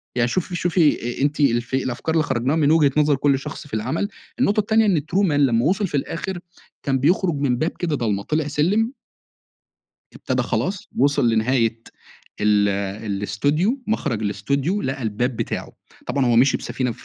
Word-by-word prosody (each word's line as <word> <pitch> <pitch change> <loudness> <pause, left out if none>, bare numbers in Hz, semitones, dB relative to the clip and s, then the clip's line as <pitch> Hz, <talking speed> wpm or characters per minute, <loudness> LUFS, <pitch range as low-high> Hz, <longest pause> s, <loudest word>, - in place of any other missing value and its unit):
يعني 120 -1 +2
شوفي 180 +6 -2
شوفي 160 -9 +1
أ - - -2
أنتِ 145 +2 0
في 125 0 +1
الأفكار 130 +6 -2
اللي 160 - +3
خَرّجناها 130 +2 0
من 150 -2 +3
وجهة 155 -3 +4
نظر 150 -1 +4
كل 140 0 +2
شخص 150 +1 -8
في 140 - -19
العَمَل، 155 - -1 0.3
النقطة 215 -4 +2
التانية 220 +1 +3
إن 195 -5 +3
true 180 +7 0
man - - 0
لمّا 130 -5 +2
وصل 195 +4 +1
في 145 - -2
الآخر 175 +6 -4 0.4
كان 135 -2 0
بيخرج 170 +3 +2
من 140 -3 0
باب 155 +6 0
كده 165 -4 0
ضلمه، 105 -6 -1
طلع 155 +3 -1
سلم 185 - +1 1.2
ابتدى - - -1
خلاص 195 0 -2
وصل 140 -1 +3
لنهاية 115 0 +1 0.6
ال 105 -1 +3 0.4
الإستوديو، 145 - 0
مخرج 145 - -1
الإستوديو، 140 - -1
لقى 135 0 -3
الباب 115 +3 -1
بتاعه. - - -4 0.3
طبعًا 140 -2 0
هو 120 -1 +3
مشي 130 +4 +5
بسفينة 125 -2 -3
في - - -16
140 Hz, 175 wpm, -22 LUFS, 120-165 Hz, 1.2 s, مشي